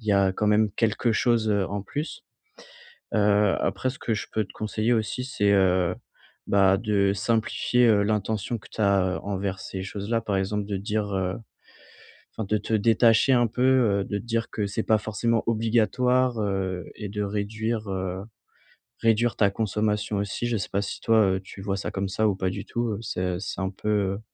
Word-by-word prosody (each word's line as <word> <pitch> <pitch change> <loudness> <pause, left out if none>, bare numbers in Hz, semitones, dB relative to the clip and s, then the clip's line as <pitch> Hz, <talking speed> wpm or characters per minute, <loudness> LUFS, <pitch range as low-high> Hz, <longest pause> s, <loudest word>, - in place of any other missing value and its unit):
il 110 - -15
y 105 - +3
a 100 -1 +3
quand 105 - -1
même 105 0 +3
quelque 115 +1 +1
chose, 115 -1 +2
heu, 100 -2 +1
en 100 +2 -3
plus. 145 +9 -5 0.9
Heu, 105 -1 +3
après 130 - -1
ce 130 - -7
que 115 - -1
je 105 - -3
peux 110 - 0
te 100 - -13
conseiller 110 +2 -1
aussi 115 +2 -1
c'est, 105 -6 +1
heu, 90 -2 +3 0.5
bah, 95 -1 +4
de 100 -2 +1
simplifier, 115 +3 +1
heu, 105 -2 +4
l'intention 105 +2 -1
que 105 - -15
tu - - -5
as 95 -2 +2
heu, - - -6
envers 100 -1 -3
ces 95 - -6
choses 100 +2 -6
là, 115 - +2
par 105 -3 -2
exemple 100 +2 -1
de 100 -1 -3
dire, 105 +1 -2
heu 95 0 -1 1.0
enfin 110 - -2
de 105 - +2
te 110 - -6
détacher 115 +3 +4
un 120 -2 +4
peu, 125 +3 -3 0.4
heu, - - -4
de 100 - -3
te - - -8
dire 115 -1 -1
que 105 - -2
c'est 105 +3 -2
pas 110 -1 +3
forcément 110 +2 0
obligatoire, 120 +2 +2
heu, 95 -3 -2
et 105 - -6
de 105 +1 -3
réduire, 110 +2 -2
heu 95 0 -3 0.8
réduire 115 0 +2
ta 100 -2 +3
consommation 105 0 -1
aussi 100 +3 -2
je 120 -1 0
sais 100 - -4
pas 100 - 0
si - - -5
toi, 115 -1 +4 0.2
heu, - - -4
tu 95 0 -11
vois 95 0 -2
ça 100 - -4
comme 95 0 -2
ça 110 +3 +1
ou 100 - +1
pas 95 -1 -1
du - - -5
tout, 120 0 -2
heu, 100 - -5
c'est 90 -5 -2
c'est 95 - -5
un 95 - 0
peu, 100 +2 -6
heu, 100 -1 0
105 Hz, 205 wpm, -25 LUFS, 100-110 Hz, 1.0 s, bah